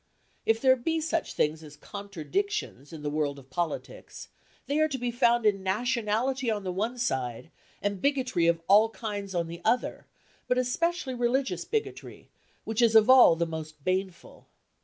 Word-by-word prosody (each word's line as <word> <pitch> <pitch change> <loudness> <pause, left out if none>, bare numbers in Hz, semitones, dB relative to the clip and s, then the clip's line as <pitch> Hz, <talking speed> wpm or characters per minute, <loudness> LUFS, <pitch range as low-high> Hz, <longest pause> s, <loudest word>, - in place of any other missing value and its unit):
If 225 0 +3
there 260 +1 +5
be 320 +6 -1
such 320 +1 -2
things 155 +1 0
as 150 -1 -12
contradictions 200 - -4
in 160 -2 -9
the 145 - -1
world 145 -2 -1
of 135 -1 -15
politics, 175 - -5 0.4
they 285 +2 0
are 310 - +4
to 275 -4 -4
be 245 -1 -2
found 240 -1 +2
in 200 -2 +3
nationality 235 +5 0
on 210 -2 -1
the 185 - -3
one 220 +7 -2
side, 130 - -3 0.3
and 200 -2 -2
bigotry 260 -12 +1
of 165 0 +1
all 210 +3 +6
kinds 205 -4 -5
on 170 -1 0
the 170 +1 -8
other, 250 - 0 0.4
but 250 - +1
especially 270 +3 0
religious 250 +2 0
bigotry, 445 -1 -5 0.3
which 220 +1 -1
is 230 -1 +4
of 220 +3 +7
all 255 -10 +8
the 170 +1 0
most 155 -2 -7
baneful. 185 0 -3
215 Hz, 170 wpm, -28 LUFS, 170-255 Hz, 0.4 s, all